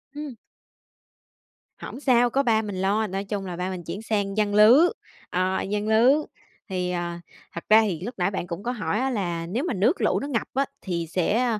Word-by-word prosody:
Ừm. 295 -4 -6 1.4
Hổng - - -8
sao, 245 -4 +3
có 275 +3 +1
ba 225 -3 +3
mình 205 -3 -5
lo, 210 +3 +1
nói 195 0 -3
chung 200 -1 -4
là 180 -2 -5
ba 180 +2 -3
mình 185 -2 -6
chuyển 200 - -6
sang 205 -2 -2
giăng 205 -1 +1
lưới, 240 +11 +7 0.4
ờ, 185 +1 0
giăng 210 +1 -2
lưới. 225 +5 +5 0.6
Thì, 180 -1 -2
ờ, 175 -1 -3 0.4
thật 170 - -6
ra 220 +1 +8
thì 190 -7 -1
lúc 235 +7 -5
nãy 185 +2 0
bạn 185 -2 -4
cũng 170 +3 -6
có 245 - -1
hỏi 215 -2 -2
á 265 +1 0
là 175 -8 -2
nếu 215 +11 -2
mà 350 - -1
nước 225 - +1
lũ - - +2
nó 280 - -5
ngập 245 -6 -2
á, 275 +2 +1 0.2
thì 170 -3 -3
sẽ, 205 +8 +1
ơ, 230 -4 0
210 Hz, 215 wpm, -25 LUFS, 185-235 Hz, 1.4 s, ra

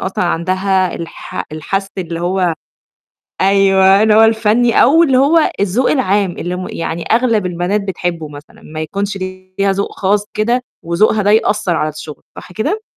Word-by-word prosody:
أصلًا 190 -1 -2
عندها 185 +2 0
الح 165 0 -7
الحس 195 +5 -3
اللي 170 -2 -4
هو 180 -1 0 0.9
أيوه، 195 +1 +4
اللي 220 -1 +4
هو 220 - +6
الفَنّي 225 +1 +3
أو 320 +7 +5
اللي 265 -5 +2
هو 305 +4 +3
الذوق 205 +6 +1
العام 205 -8 +1
اللي 175 +1 -5
م 185 - -5
يعني 165 0 -4
أغلب 230 -4 +2
البنات 180 +3 -1
بتحبّه 175 -4 -4
مثلًا 145 0 -14
ما 155 0 -7
يكونش 200 +4 -3
ليها 185 +1 -3
ذوق 200 +1 -2
خاص 205 +1 +1
كده 235 +4 0 0.2
وذوقها 205 +5 +1
ده 205 - +3
يأثّر 210 -4 +1
على 155 -1 -1
الشُغل، 155 0 -9 0.2
صح - - -11
كده؟ 395 - -2
195 Hz, 160 wpm, -15 LUFS, 175-215 Hz, 0.9 s, هو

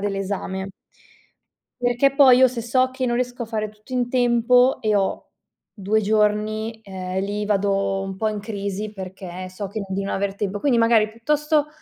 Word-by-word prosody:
dell'esame. 195 -1 -3 1.1
Perché 245 +3 +2
poi, 265 -3 +7
io 260 0 +7
se 240 -2 -5
so 255 +2 +2
che 260 0 -3
non 240 -1 0
riesco 245 0 -2
a - - -5
fare 215 -1 -2
tutto 215 +4 -16
in 245 -1 0
tempo 245 +1 +3
e 215 -1 +1
ho 195 -1 -1 0.4
2 210 +1 0
giorni, 215 +1 0
ehm, 190 -2 -4
lì 205 +1 -2
vado 195 -1 0
un 195 -1 -5
po' 220 +2 0
in 215 - -3
crisi 205 0 -4
perché 185 -1 -8
so 195 +2 -5
che 210 +3 -5
non 195 - -7
di 200 - -1
non - - -2
aver 195 0 -1
tempo. 205 0 -3
Quindi, 255 -5 +2
magari 225 -2 +4
piuttosto 300 +6 0
215 Hz, 185 wpm, -22 LUFS, 195-245 Hz, 1.1 s, poi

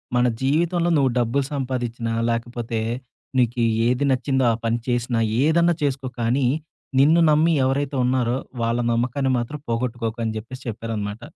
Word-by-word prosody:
మన 125 0 +3 0.2
జీవితంలో 170 +5 +1
నువ్వు 135 -3 +3
డబ్బులు 125 +4 +1
సంపాదించినా, 120 -4 -2 0.2
లేకపోతే 115 0 -2 0.6
నీకి 120 -1 +1 0.2
ఏది 125 +3 +1
నచ్చిందో 130 0 +1
ఆ - - 0
పని 115 +1 +1
చేసినా 120 -1 0 0.2
ఏదన్నా 170 +2 +4
చేసుకో 135 -2 -1
కానీ 125 +3 +1 0.5
నిన్ను 155 +5 +5
నమ్మి 155 +2 +4
ఎవరైతే 135 +1 0
ఉన్నారో 125 -1 +1 0.3
వాళ్ళ 115 +1 +1
నమ్మకాన్ని 130 +3 0
మాత్రం 140 +5 -5
పోగొట్టుకోకు" 115 -1 -2
అని 110 0 -2
జెప్పేసి 130 +4 -8
చెప్పారనమాట. 110 -1 -4
125 Hz, 135 wpm, -23 LUFS, 115-140 Hz, 0.6 s, నిన్ను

